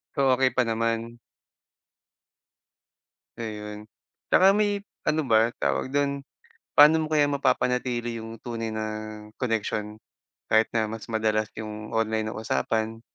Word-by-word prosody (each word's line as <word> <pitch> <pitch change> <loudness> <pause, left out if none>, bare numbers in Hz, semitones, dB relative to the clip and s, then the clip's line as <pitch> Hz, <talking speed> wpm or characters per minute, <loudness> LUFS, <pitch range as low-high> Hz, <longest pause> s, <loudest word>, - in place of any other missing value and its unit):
So, 140 - +1 0.2
okey 130 0 +3
pa 130 - +4
naman? 115 +1 -1 2.2
Ayun, 105 -2 -6 0.5
tsaka 190 +1 +7
may 205 0 +2 0.2
ano 155 +1 +2
ba 115 +1 +4
tawag 70 - 0
do'n? 140 -1 0 0.5
Paano 155 +2 +7
mo - - -3
kaya 150 -2 +4
mapapanatili 125 -3 0
yung 115 0 -7
tunay 115 -2 -4
na 110 0 -3 0.5
koneksyon 110 -2 -2 0.5
kahit 110 0 +5
na 110 -1 +1
mas 110 0 -7
madalas 110 -1 0
yung 110 0 -7
online 110 -1 0
na 110 - -4
usapan? 110 +5 -1
115 Hz, 125 wpm, -26 LUFS, 110-130 Hz, 2.2 s, tsaka